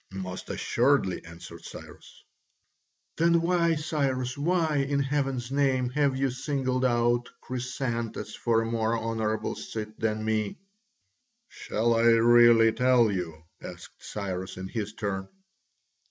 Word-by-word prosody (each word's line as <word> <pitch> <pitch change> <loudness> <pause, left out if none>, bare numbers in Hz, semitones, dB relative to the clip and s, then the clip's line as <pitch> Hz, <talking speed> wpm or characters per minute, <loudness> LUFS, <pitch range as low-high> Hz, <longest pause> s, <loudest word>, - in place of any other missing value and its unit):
"Most 95 -1 -6
assuredly," 120 -8 +1
answered 85 0 -11
Cyrus. - - -12 0.9
"Then 170 +1 +4
why, 170 -1 +2
Cyrus, 135 -5 -1
why, 160 0 +1
in 140 0 0
heaven's 135 -3 -1
name, 135 -3 +1
have 140 -1 +1
you 135 -1 0
singled 130 -1 -2
out 120 -1 +2
Chrysantas 120 -4 -4
for 115 -1 +1
a - - -4
more 115 0 0
honourable 110 -1 -2
seat 110 -1 -7
than 110 -1 -1
me?" 110 -2 -1 0.9
"Shall 115 +2 -1
I 115 - +2
really 115 0 +6
tell 125 -1 +3
you?" 85 -4 -4 0.2
asked - - -11
Cyrus 95 -3 -5
in 95 0 -6
his 105 -1 -4
turn. 100 -3 -3
120 Hz, 125 wpm, -27 LUFS, 110-135 Hz, 0.9 s, really